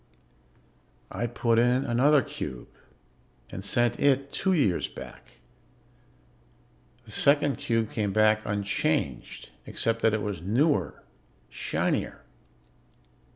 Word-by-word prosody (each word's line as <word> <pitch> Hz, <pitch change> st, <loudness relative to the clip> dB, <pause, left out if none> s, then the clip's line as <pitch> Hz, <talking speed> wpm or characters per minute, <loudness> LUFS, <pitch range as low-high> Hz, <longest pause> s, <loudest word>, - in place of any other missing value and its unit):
"I 120 Hz, -, -2 dB
put 115 Hz, -1 st, +1 dB
in 125 Hz, +2 st, +2 dB
another 135 Hz, +4 st, +3 dB
cube 75 Hz, -, -7 dB, 0.8 s
and 95 Hz, -, -7 dB
sent 120 Hz, +3 st, +1 dB
it 140 Hz, 0 st, +2 dB
two 190 Hz, -, 0 dB
years 120 Hz, -, +1 dB
back. -, -, -12 dB, 1.7 s
The -, -, -12 dB
second 145 Hz, -2 st, +2 dB
cube 115 Hz, -2 st, -1 dB
came 105 Hz, -3 st, -1 dB
back 110 Hz, +1 st, +3 dB
unchanged, 100 Hz, -10 st, -2 dB, 0.2 s
except 115 Hz, 0 st, -1 dB
that 110 Hz, -1 st, +3 dB
it 105 Hz, -, -3 dB
was 100 Hz, -5 st, -4 dB
newer, 105 Hz, -, 0 dB, 0.5 s
shinier. -, -, -2 dB
115 Hz, 105 wpm, -27 LUFS, 105-135 Hz, 1.7 s, another